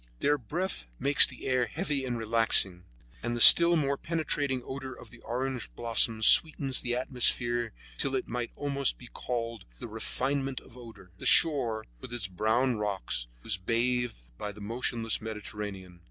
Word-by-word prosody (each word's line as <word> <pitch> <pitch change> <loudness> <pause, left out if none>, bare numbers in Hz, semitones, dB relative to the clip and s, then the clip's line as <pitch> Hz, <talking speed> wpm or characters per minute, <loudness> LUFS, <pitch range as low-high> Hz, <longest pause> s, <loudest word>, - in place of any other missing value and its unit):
Their 145 0 +1
breath 160 - -2
makes 140 +1 +5
the 130 - -11
air 130 -2 0
heavy 145 - -4
and 120 -2 -4
relaxing, 110 -5 +1 0.4
and 120 0 -3
the - - -4
still 170 +7 +11
more 140 -3 -1
penetrating 145 -6 -3
odor 130 -1 -8
of - - -15
the 120 - -16
orange 125 +1 -5
blossoms 115 -1 +1
sweetens 140 -5 +4
the 120 0 -3
atmosphere 120 -2 0 0.3
till 135 -1 -1
it 130 - -3
might 120 0 -4
almost 140 -2 -2
be 125 - -14
called 115 -3 -5
the - - -9
refinement 135 -1 -3
of - - -19
odor. 115 -7 -14
The - - -4
shore, 120 -9 +2
with - - -11
its 120 -4 -5
brown 110 +6 -1
rocks, 95 -12 -3 0.2
was 105 -5 -1
bathed 115 - -2
by 105 - -5
the 105 - -15
motionless 115 +1 -3
Mediterranean. 105 -4 -8
120 Hz, 160 wpm, -28 LUFS, 110-135 Hz, 0.4 s, still